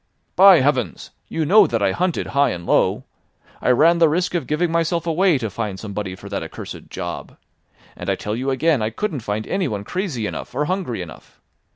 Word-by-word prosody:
"By 190 -5 +8
heavens! 130 - -1 0.2
You 160 -1 -2
know 210 +7 +6
that 115 -3 -1
I 100 - +3
hunted 180 - -1
high 140 0 +3
and 85 -1 -5
low. - - +2 0.6
I - - +1
ran 165 +7 +5
the 165 -2 +5
risk 175 +4 0
of 175 - -2
giving 160 +3 0
myself 165 0 0
away 170 0 +3
to 115 -4 -3
find 100 -1 -4
somebody 100 -3 -5
for - - -12
that - - -3
accursed - - -8
job. - - -6 0.6
And 90 - -6
I 95 - +2
tell 105 +3 -4
you 130 +3 -2
again 140 0 +2
I 110 - 0
couldn't 155 - -3
find 110 -1 -3
anyone 130 - -2
crazy 160 - -3
enough 115 - -6
or 150 +3 0
hungry 170 - -2
enough. 80 - -14
140 Hz, 200 wpm, -21 LUFS, 110-170 Hz, 0.6 s, By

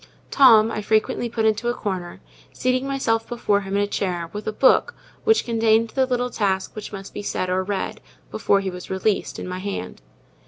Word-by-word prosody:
Tom 225 -5 +6
I 215 - -3
frequently 220 +3 0
put 225 -1 -1
into 220 +2 +1
a 240 - -1
corner, 185 -6 -5 0.3
seating 255 +1 0
myself 225 -5 -1
before 210 -4 +1
him 195 0 -4
in 205 - +2
a - - -1
chair, 175 -4 -3
with 210 0 -6
a - - +1
book 270 - +3 0.3
which 445 0 +3
contained 225 -1 +2
the 265 -1 +1
little 250 -1 -1
task 190 -4 -1
that 215 - -7
must 195 -1 -8
be - - -5
said 185 -2 -2
or 185 +1 +1
read, 195 0 -3 0.3
before 200 -1 +2
he 190 -1 -3
was 180 0 -9
released, 190 +2 -1
in - - -6
my 180 0 -4
hand. 190 - -5
215 Hz, 200 wpm, -23 LUFS, 195-235 Hz, 0.3 s, Tom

